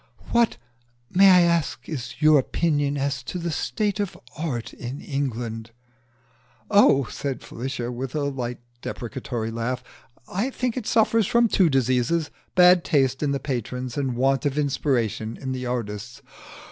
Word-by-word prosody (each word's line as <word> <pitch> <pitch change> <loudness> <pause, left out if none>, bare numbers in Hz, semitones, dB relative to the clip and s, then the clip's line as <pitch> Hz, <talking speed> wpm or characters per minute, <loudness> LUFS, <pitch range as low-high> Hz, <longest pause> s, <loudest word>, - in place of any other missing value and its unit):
"What, 235 -1 +3 0.5
may 195 +2 +7
I 180 -1 +7
ask, 170 -7 +1
is 130 -6 -5
your 155 -1 +6
opinion 145 0 0
as 140 -1 -1
to 125 - -5
the 170 -1 -3
state 205 +4 -1
of 205 -3 -2 0.2
Art 140 -7 -4
in 125 +4 -6
England?" 120 -5 -3 1.0
"Oh," 200 -9 +6
said 140 -2 -4
Felicia, 125 -1 -4
with 125 +3 -5
a 150 - 0
light 125 -4 -3 0.2
deprecatory 120 -2 -4
laugh, 115 +2 -3 0.4
"I 205 +8 -1
think 250 -3 -2
it 250 -5 -4
suffers 225 -2 +3
from 235 +1 +4
two 190 -5 +3
diseases 135 +4 +1 0.2
bad 180 -1 +7
taste 135 -3 +1
in 150 - +1
the 140 0 0
patrons 125 -2 -4
and 135 -4 -1
want 135 +1 +2
of 140 0 -3
inspiration 125 -6 0
in 130 -1 -4
the 130 -1 -3
artists." 105 -5 -4
135 Hz, 150 wpm, -24 LUFS, 125-170 Hz, 1.0 s, may